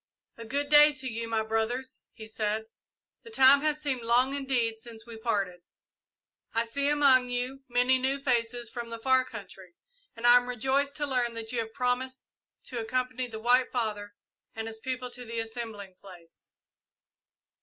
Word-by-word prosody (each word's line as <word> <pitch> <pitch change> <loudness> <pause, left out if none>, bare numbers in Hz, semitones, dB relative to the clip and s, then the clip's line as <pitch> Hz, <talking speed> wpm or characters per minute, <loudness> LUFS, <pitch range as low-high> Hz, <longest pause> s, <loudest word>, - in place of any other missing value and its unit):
"A 230 - -9
good 285 +5 -2
day 295 0 +8
to 260 -1 -4
you, 230 -1 -4
my 225 -1 0
brothers," 225 +4 -2
he 220 -1 -11
said. 215 0 -2 0.6
"The 460 - -13
time 280 -9 +6
has 305 0 0
seemed 265 -4 -1
long 245 +3 +3
indeed 250 -5 -1
since 225 -1 -10
we 235 -1 -9
parted. 200 -6 -2 0.9
I 230 +1 +2
see 280 +5 -1
among 270 -4 +4
you 250 +2 -3
many 250 +1 +3
new 265 +2 0
faces 240 -3 -1
from 235 -1 -6
the 230 - -5
far 260 +2 +3
country, 195 -7 -11 0.4
and 230 +1 -6
I 240 0 +9
am 245 0 -1
rejoiced 265 +4 0
to 295 - -1
learn 250 -4 0
that 225 0 -5
you 245 - -1
have 225 -1 -4
promised 255 0 -2 0.3
to 245 - -5
accompany 255 +2 -2
the 220 -2 -8
White 245 +3 +3
Father 210 -4 -3 0.4
and 225 0 -4
his 225 0 -7
people 255 0 -4
to 250 - -8
the 230 -1 -7
assembling 225 -4 -6
place. 175 -4 -14
245 Hz, 175 wpm, -28 LUFS, 225-260 Hz, 0.9 s, I